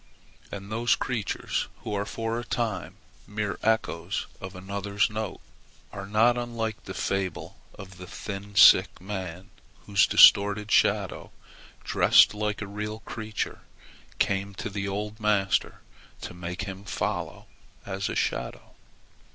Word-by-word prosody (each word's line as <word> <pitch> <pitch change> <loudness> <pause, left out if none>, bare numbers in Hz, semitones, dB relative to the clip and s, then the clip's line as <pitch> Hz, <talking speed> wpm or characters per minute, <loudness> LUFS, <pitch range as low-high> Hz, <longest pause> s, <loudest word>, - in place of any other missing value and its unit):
And 100 +1 -7
those 115 +2 +2
creatures 115 -6 -2 0.2
who 105 - -4
are 100 0 -2
for 115 +1 -3
a - - -5
time 110 -8 -3 0.3
mere 105 -1 -3
echoes 100 -5 0 0.2
of 95 0 -7
another's 100 +3 -1
note 110 -3 -4 0.5
are 100 -1 -6
not 115 +4 +3
unlike 115 -3 -4
the 95 - -7
fable 95 -1 -3 0.2
of 95 -2 -11
the 90 - -9
thin 100 +2 -7
sick 95 -2 +7
man 95 -1 -6 0.3
whose 100 -1 +4
distorted 105 +1 +6
shadow, - - +2 0.5
dressed - - +5
like 105 0 -2
a - - -6
real 105 +2 -5
creature, 110 -2 -5 0.6
came 100 0 0
to 110 - -5
the 100 0 -3
old 105 +2 -4
master 100 -3 +1 0.4
to - - -6
make 90 +1 -5
him 95 0 -7
follow 100 - -3 0.4
as 95 0 -3
a - - -3
shadow. 60 0 -3
100 Hz, 135 wpm, -27 LUFS, 95-110 Hz, 0.6 s, sick